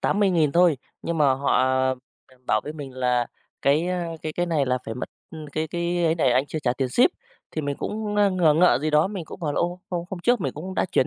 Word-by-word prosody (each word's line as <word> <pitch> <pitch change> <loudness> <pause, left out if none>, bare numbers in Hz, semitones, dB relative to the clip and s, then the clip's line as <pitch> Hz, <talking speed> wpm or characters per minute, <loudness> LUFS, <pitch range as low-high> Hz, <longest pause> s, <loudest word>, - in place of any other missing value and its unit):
80.000 180 -8 +2
thôi, 170 -3 +4 0.3
nhưng 170 -1 -2
mà 145 -3 +5
họ 135 -1 +2 0.7
b - - -23
bảo 110 - +2
với 150 - -5
mình 145 -4 -8
là 125 -2 +1 0.4
cái, 150 +5 +3
a, 180 -2 -1 0.2
cái 155 - -3
cái 175 +3 -1
này 155 -5 +1
là 125 0 +1
phải 110 - -5
mất 125 - -5 0.4
cái 155 +2 -1
cái 175 +1 -1
ấy 160 - +3
này 155 -6 +2
anh 130 +3 +2
chưa 155 - -4
trả 130 -5 0
tiền 130 +1 -2
ship. 245 - +4 0.4
Thì 155 - -3
mình 140 -1 -2
cũng, 210 -1 -3
ơ, 205 -1 +4
ngờ 170 -5 +3
ngợ 175 -2 +5
gì 155 +2 -1
đó, 150 +3 +4
mình 195 -4 -5
cũng 175 - -10
hỏi 150 - -1
là, - - -1
ô, 175 +1 -2
hôm 175 -1 -2
hôm 185 -3 -5
trước 240 +3 +2
mình 135 -7 -2
cũng 185 +6 -7
đã - - +1
chuyển 130 - +3
160 Hz, 255 wpm, -24 LUFS, 140-175 Hz, 0.7 s, mà